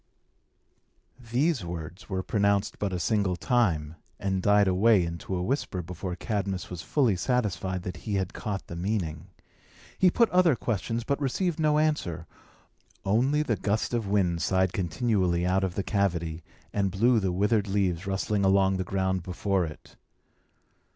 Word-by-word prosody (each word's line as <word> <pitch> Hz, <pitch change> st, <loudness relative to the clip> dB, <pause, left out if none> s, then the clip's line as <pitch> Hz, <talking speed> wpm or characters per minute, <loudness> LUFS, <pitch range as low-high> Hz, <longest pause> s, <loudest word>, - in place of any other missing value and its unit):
These 135 Hz, -, +1 dB
words 85 Hz, +3 st, -7 dB
were 95 Hz, -1 st, -2 dB
pronounced 100 Hz, 0 st, +1 dB
but 100 Hz, -2 st, -1 dB
a 90 Hz, -, -1 dB
single 100 Hz, -1 st, +1 dB
time, 85 Hz, -, 0 dB, 0.2 s
and 95 Hz, -1 st, -1 dB
died 105 Hz, 0 st, +4 dB
away 95 Hz, 0 st, +4 dB
into 85 Hz, +3 st, -4 dB
a 90 Hz, -, -1 dB
whisper 95 Hz, -6 st, -2 dB
before 90 Hz, +1 st, -5 dB
Cadmus 95 Hz, -3 st, -3 dB
was 90 Hz, -2 st, -5 dB
fully 125 Hz, -5 st, +2 dB
satisfied 95 Hz, -3 st, -1 dB
that 90 Hz, -, -5 dB
he 105 Hz, -3 st, -3 dB
had 95 Hz, -2 st, -1 dB
caught 100 Hz, -3 st, -4 dB
the 85 Hz, -, -8 dB
meaning. 85 Hz, -4 st, -2 dB, 0.7 s
He 185 Hz, -, +6 dB
put 230 Hz, +6 st, +3 dB
other 180 Hz, -5 st, +4 dB
questions, 115 Hz, +1 st, -2 dB
but 140 Hz, +3 st, -1 dB
received 160 Hz, +5 st, -1 dB
no 150 Hz, -1 st, +3 dB
answer; 150 Hz, -, 0 dB, 0.8 s
only 130 Hz, +9 st, +2 dB
the 120 Hz, -7 st, 0 dB
gust 105 Hz, +5 st, -1 dB
of 115 Hz, -4 st, -1 dB
wind 90 Hz, -4 st, +1 dB
sighed 95 Hz, +3 st, +1 dB
continually 90 Hz, -1 st, 0 dB
out 95 Hz, +1 st, +2 dB
of 95 Hz, -1 st, -2 dB
the 100 Hz, -, -1 dB
cavity, 85 Hz, -6 st, -1 dB, 0.3 s
and 100 Hz, -1 st, +1 dB
blew 115 Hz, +5 st, +3 dB
the 95 Hz, -3 st, 0 dB
withered 105 Hz, +3 st, +1 dB
leaves 95 Hz, -2 st, 0 dB
rustling 100 Hz, +1 st, 0 dB
along 95 Hz, 0 st, +3 dB
the 95 Hz, -, -1 dB
ground 95 Hz, 0 st, -1 dB
before 95 Hz, +1 st, -1 dB
it. 75 Hz, -3 st, -11 dB
95 Hz, 155 wpm, -27 LUFS, 90-110 Hz, 0.8 s, He